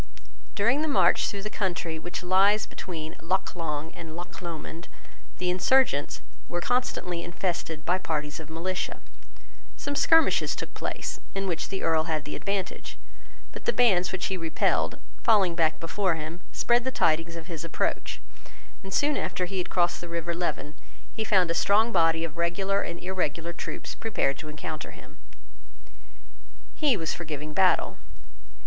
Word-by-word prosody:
During 235 +8 +3
the 315 - 0
march 285 - +4
through 200 -1 -4
the 215 - -4
country 175 -4 -1
which 175 +2 -5
lies 195 +3 +4
between 160 -3 -6
Loch 185 +4 0
Long 160 -2 -3
and 165 -3 -9
Loch 175 +1 -7
Lomond, 170 0 -6 0.5
the 180 0 +1
insurgents 185 - +3 0.3
were 175 - -1
constantly 180 -6 0
infested 170 -3 -3
by 180 +1 +2
parties 150 -4 -2
of 160 -1 -9
militia. 180 +3 -2 0.8
Some 285 0 -3
skirmishes 325 +2 +4
took - - -6
place, - - -3 0.2
in 195 0 -1
which 175 -4 -2
the 195 - -3
Earl 160 -1 +3
had 155 -3 -1
the - - -5
advantage; 195 -2 -3 0.5
but - - -9
the 475 - +4
bands 185 -7 +4
which 185 -1 -2
he 190 - -1
repelled, 165 -2 +1 0.2
falling 200 -6 +4
back 160 -2 +2
before 180 +1 0
him, 160 +3 -6
spread 240 0 +3
the 260 - 0
tidings 165 -7 +2
of 165 -1 -7
his 165 -2 -5
approach, 165 - -1 0.6
and, 195 - -9
soon 290 +7 +3
after 180 - -1
he 190 +1 -3
had 180 - -2
crossed 175 -1 +1
the 175 - -7
river 170 0 -2
Leven, 170 -3 -2 0.4
he 220 - -2
found 185 -5 +3
a - - +2
strong 215 +6 +4
body 165 -3 +3
of 165 0 -5
regular 190 +4 +1
and 170 - -4
irregular 170 -2 -2
troops - - -5
prepared 165 - 0
to 155 -1 -6
encounter 155 +1 -5
him. - - -14 1.5
He 285 -7 +3
was 165 -3 -1
for 175 - -5
giving 155 -1 -5
battle. 190 +1 +3
175 Hz, 165 wpm, -28 LUFS, 165-195 Hz, 1.5 s, march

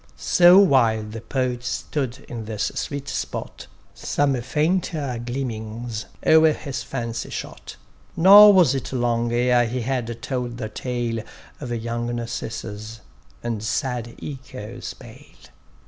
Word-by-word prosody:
So 175 +1 +6
while 130 - +4
the 105 +1 -8
Poet 125 -1 -2
stood 130 0 -3
in 115 -2 -6
this 105 -1 -2
sweet 140 -1 -4
spot, - - -5 0.3
Some 145 -1 0
fainter 150 -2 -1
gleamings 115 -3 -5 0.2
o'er 160 0 +6
his 140 -3 -5
fancy 115 -3 -4
shot; - - -7 0.4
Nor 200 +5 +10
was 180 -9 +5
it 135 -2 -4
long 120 -2 0
ere 120 0 +3
he 125 +2 -3
had 120 -2 -3
told 125 -3 -3
the 110 -3 -4
tale 120 0 -3 0.4
Of 125 -4 -6
young 120 +1 -3
Narcissus, 115 -2 -6 0.4
and 115 -3 -3
sad 120 0 -2
Echo's 130 -6 -7
bale. - - -15
120 Hz, 125 wpm, -23 LUFS, 115-135 Hz, 0.4 s, Nor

